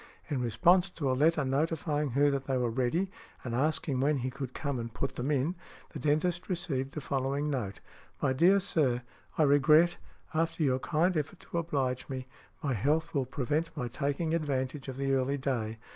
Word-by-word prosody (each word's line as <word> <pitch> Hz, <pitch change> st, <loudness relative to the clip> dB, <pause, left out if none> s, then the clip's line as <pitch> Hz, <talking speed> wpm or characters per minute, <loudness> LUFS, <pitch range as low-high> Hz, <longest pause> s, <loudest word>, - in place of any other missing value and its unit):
In 135 Hz, -3 st, 0 dB
response 170 Hz, -, +4 dB
to 145 Hz, -7 st, -1 dB
a -, -, +2 dB
letter 150 Hz, +2 st, +3 dB
notifying 150 Hz, +1 st, 0 dB
her 145 Hz, 0 st, +5 dB
that 135 Hz, -1 st, -2 dB
they 135 Hz, -1 st, 0 dB
were 120 Hz, -2 st, 0 dB
ready, 135 Hz, +11 st, 0 dB, 0.3 s
and 120 Hz, -, -4 dB
asking 140 Hz, +1 st, +1 dB
when 145 Hz, +2 st, +2 dB
he 130 Hz, 0 st, -2 dB
could 135 Hz, -1 st, -6 dB
come 140 Hz, -4 st, -2 dB
and 115 Hz, 0 st, -5 dB
put 135 Hz, +4 st, -3 dB
them 125 Hz, +3 st, -2 dB
in, 150 Hz, +3 st, +1 dB, 0.4 s
the -, -, -6 dB
dentist 170 Hz, +5 st, 0 dB
received 140 Hz, -7 st, -2 dB
the 150 Hz, -, -3 dB
following 140 Hz, +2 st, -1 dB
note: 115 Hz, -8 st, -3 dB, 0.4 s
"My 130 Hz, -, +1 dB
dear 180 Hz, +9 st, +5 dB
Sir, 130 Hz, -9 st, +1 dB, 0.3 s
I 155 Hz, -, +5 dB
regret, 150 Hz, +4 st, +5 dB, 0.4 s
after 165 Hz, 0 st, 0 dB
your 130 Hz, -2 st, +2 dB
kind 170 Hz, +6 st, +1 dB
effort 155 Hz, +4 st, -2 dB
to -, -, -5 dB
oblige 135 Hz, -6 st, -1 dB
me, 130 Hz, -1 st, -4 dB, 0.4 s
my 140 Hz, -3 st, +1 dB
health 155 Hz, -, +1 dB
will 140 Hz, -4 st, +1 dB
prevent 150 Hz, +5 st, -2 dB
my 125 Hz, -4 st, -2 dB
taking 145 Hz, +5 st, -1 dB
advantage 140 Hz, -3 st, -1 dB
of 130 Hz, -1 st, -5 dB
the 135 Hz, 0 st, 0 dB
early 135 Hz, +1 st, +1 dB
day. 120 Hz, -5 st, -2 dB
140 Hz, 190 wpm, -30 LUFS, 130-160 Hz, 0.4 s, her